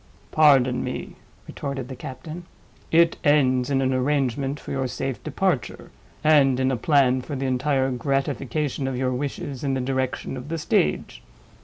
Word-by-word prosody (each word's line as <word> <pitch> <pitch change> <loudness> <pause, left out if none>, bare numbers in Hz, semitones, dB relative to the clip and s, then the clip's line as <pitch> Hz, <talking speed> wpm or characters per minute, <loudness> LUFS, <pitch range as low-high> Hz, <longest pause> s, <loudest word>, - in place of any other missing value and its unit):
"Pardon 135 -5 +4
me," - - -5 0.3
retorted 140 -3 -5
the 130 - -7
captain. 160 +8 -8 0.5
"It 165 +1 +4
ends 130 -4 +3
in 135 -1 +1
an 130 0 +1
arrangement 135 +1 0
for - - -9
your 135 -1 -1
safe 135 +1 -4
departure, 155 - -2 0.3
and 140 -4 +4
in 130 0 +2
a - - +1
plan 130 0 +3
for 145 +3 -6
the 135 0 -3
entire 130 +1 +1
gratification 135 +2 -1
of 130 -2 -2
your 130 0 0
wishes 135 0 -4
in 135 -2 0
the - - -1
direction 130 0 -2
of 125 +3 -8
the 165 - -2
stage. 75 - 0
135 Hz, 160 wpm, -24 LUFS, 130-145 Hz, 0.5 s, Pardon